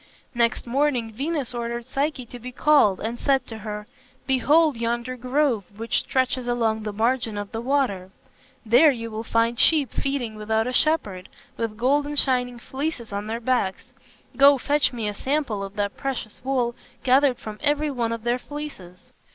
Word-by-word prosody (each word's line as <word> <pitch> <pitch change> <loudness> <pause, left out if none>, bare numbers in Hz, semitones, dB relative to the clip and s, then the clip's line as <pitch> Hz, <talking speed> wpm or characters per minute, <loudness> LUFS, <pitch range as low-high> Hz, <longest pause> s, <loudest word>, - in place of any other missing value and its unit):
Next 235 -1 +1
morning 245 -3 0
Venus 280 +1 -2
ordered 235 0 -4
Psyche 275 0 -2
to 245 +1 -10
be 250 +2 -7
called 265 -8 +4
and 230 +2 -4
said 275 -2 +2
to 225 -1 -8
her, 210 0 -6 0.4
"Behold 295 +3 +3
yonder 235 +2 -2
grove 255 -2 +1
which 230 +1 0
stretches 255 -1 -1
along 225 -2 +1
the 210 0 -4
margin 225 0 0
of 205 -1 -5
the 225 - -4
water. 240 -8 0 0.6
There 245 +8 +6
you 230 -4 -3
will 220 +1 -4
find 230 +1 +1
sheep 295 -7 +4
feeding 270 -5 -2
without 220 +1 0
a 250 - -3
shepherd, 215 - +1 0.3
with 225 -2 -3
golden 290 +5 +1
shining 250 -3 +1
fleeces 265 -3 -4
on 205 +1 -3
their 225 +1 -3
backs. 235 -6 0 0.5
Go, 280 0 +7
fetch 290 +2 +1
me 230 -4 -3
a 210 - -2
sample 260 -4 -1
of 195 +1 -7
that 205 -1 -2
precious 255 -4 -4
wool 255 -3 0 0.3
gathered 265 0 +4
from 215 -1 -8
every 295 0 +1
one 235 -4 -1
of 230 -1 -4
their 240 +1 +1
fleeces." 250 -13 -9
240 Hz, 170 wpm, -24 LUFS, 220-275 Hz, 0.6 s, Go